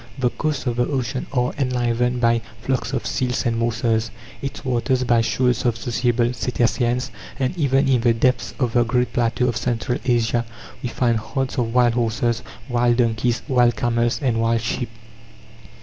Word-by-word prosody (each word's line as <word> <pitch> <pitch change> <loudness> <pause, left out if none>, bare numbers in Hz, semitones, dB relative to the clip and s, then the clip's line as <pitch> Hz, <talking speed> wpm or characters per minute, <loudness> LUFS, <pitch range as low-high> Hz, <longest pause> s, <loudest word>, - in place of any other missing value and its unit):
The 125 -2 +1
coasts 150 -3 -2
of 120 -2 -1
the 120 - +2
ocean 130 -2 -2
are 125 -2 0
enlivened 125 -1 0
by 115 -1 +3 0.2
flocks 125 0 -2
of 130 -3 -2
seals 125 0 -1
and 115 -1 +1
morses; 115 -1 0 0.3
its 135 0 -6
waters, 130 +1 +1
by 120 -2 +3
shoals 125 +2 +1
of 120 -3 +1
sociable 120 +1 0
cetaceans; 120 +1 0 0.3
and 130 +3 -1
even 140 -5 +2
in 130 -3 +3
the 120 0 +4
depths 125 +1 +1
of 125 -4 0
the 120 - +4
great 125 +2 0
plateau 120 +1 +1
of 120 -2 0
Central 120 +3 -1
Asia 120 -1 +1 0.4
we 125 - -3
find 120 -1 +1
herds 135 +4 -3
of 115 -2 0
wild 120 -1 +4
horses, 120 0 0 0.3
wild 120 -1 +2
donkeys, 115 0 +1
wild 120 -4 +3
camels, 120 +1 0
and 115 -4 +1
wild 115 0 +2
sheep. 120 +1 -2
120 Hz, 170 wpm, -22 LUFS, 115-125 Hz, 0.4 s, the